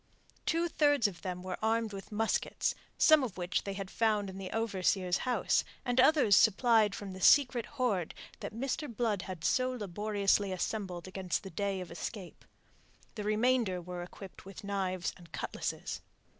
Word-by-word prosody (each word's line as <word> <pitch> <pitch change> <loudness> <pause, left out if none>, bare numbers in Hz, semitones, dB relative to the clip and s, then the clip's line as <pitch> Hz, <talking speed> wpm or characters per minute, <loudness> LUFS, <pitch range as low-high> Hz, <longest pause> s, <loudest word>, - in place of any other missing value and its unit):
Two 335 +1 +2
thirds 290 -7 +3
of 185 -4 -8
them 180 -1 -5
were 185 0 -5
armed 225 -1 +1
with 195 +1 -8
muskets, 220 +1 0 0.2
some 310 -1 +6
of 225 -8 -4
which 175 0 -1
they 200 - -3
had 195 -1 -6
found 210 -3 +1
in 190 - -9
the 190 -1 -5
overseer's 190 -4 0
house, 250 - +2 0.2
and 245 0 +3
others 265 -7 +5
supplied 220 0 +4
from 195 -2 -7
the 185 - -9
secret 250 -1 +5
hoard 205 -10 0 0.2
that - - -5
Mr. 265 +4 -3
Blood 220 -4 0
had 185 -5 -7
so 255 +7 +2
laboriously 205 -3 0
assembled 185 -1 -3
against 185 -1 -2
the 190 - -8
day 195 +2 -2
of 180 - -8
escape. 195 -6 -7 0.7
The 210 - -5
remainder 215 -2 +2
were 180 0 -6
equipped 185 +2 -10
with 195 +1 -10
knives 190 -3 -2
and 170 -3 -16
cutlasses. - - -4
205 Hz, 165 wpm, -32 LUFS, 185-230 Hz, 0.7 s, some